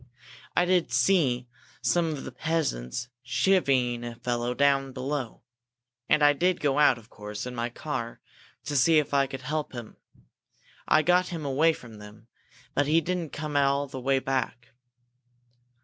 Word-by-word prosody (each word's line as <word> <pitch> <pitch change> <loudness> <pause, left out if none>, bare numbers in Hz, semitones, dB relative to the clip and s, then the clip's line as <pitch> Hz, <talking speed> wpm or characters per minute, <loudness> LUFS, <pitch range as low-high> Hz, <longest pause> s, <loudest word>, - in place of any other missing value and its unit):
"I 180 - +4
did 180 -1 +2
see 130 -11 +2 0.4
some 175 -1 +2
of 140 - -6
the - - -7
peasants 125 - -2
chivying 130 -3 +2
a 120 -1 -6
fellow 120 +1 -2
down 140 -1 +2
below. 130 -3 -4 0.7
And 155 -1 +4
I 145 0 +7
did 180 +5 +1
go 145 -1 +1
out, 145 -4 +5
of 115 -1 -16
course, 105 +1 -7
in 125 - -6
my 120 0 -2
car, 120 -2 -5 0.4
to 145 - -4
see 155 +4 +5
if 150 -1 +1
I 140 -1 +3
could 135 -1 -7
help 150 +2 -3
him. 120 -3 -8 0.9
I 155 - +4
got 180 +2 +3
him 165 -4 -5
away 150 +4 +3
from 115 -7 -12
them. 105 +2 -13 0.5
But 145 0 +1
he 160 +2 +4
didn't 170 -1 -3
come 150 -1 -5
all 140 0 +2
the 135 -2 -8
way 135 +1 +2
back. 130 -2 -2
135 Hz, 165 wpm, -27 LUFS, 120-155 Hz, 0.9 s, I